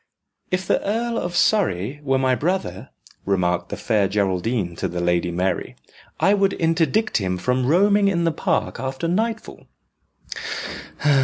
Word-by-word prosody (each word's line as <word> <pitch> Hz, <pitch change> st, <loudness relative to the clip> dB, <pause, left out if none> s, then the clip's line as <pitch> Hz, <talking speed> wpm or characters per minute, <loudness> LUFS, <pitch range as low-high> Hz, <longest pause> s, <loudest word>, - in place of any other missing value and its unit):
"If 185 Hz, +1 st, -1 dB
the -, -, +1 dB
Earl 230 Hz, +3 st, -1 dB
of 175 Hz, 0 st, -4 dB
Surrey 140 Hz, -, +1 dB
were 135 Hz, -2 st, +1 dB
my 130 Hz, -1 st, +2 dB
brother," 145 Hz, -, -2 dB, 0.3 s
remarked 90 Hz, -3 st, 0 dB
the -, -, -4 dB
Fair 105 Hz, -4 st, +1 dB
Geraldine 95 Hz, -1 st, -1 dB
to -, -, -1 dB
the 90 Hz, -, -4 dB
Lady 85 Hz, 0 st, +1 dB
Mary, 90 Hz, +2 st, -2 dB, 0.4 s
"I 195 Hz, -, +4 dB
would 195 Hz, -1 st, +2 dB
interdict 165 Hz, +6 st, +1 dB
him 95 Hz, -3 st, -1 dB
from 125 Hz, +5 st, 0 dB
roaming 200 Hz, +6 st, +4 dB
in 170 Hz, -3 st, +1 dB
the 165 Hz, -, +2 dB
park -, -, -1 dB
after 135 Hz, +4 st, -3 dB
nightfall." 220 Hz, +5 st, -2 dB
135 Hz, 145 wpm, -22 LUFS, -, 0.4 s, I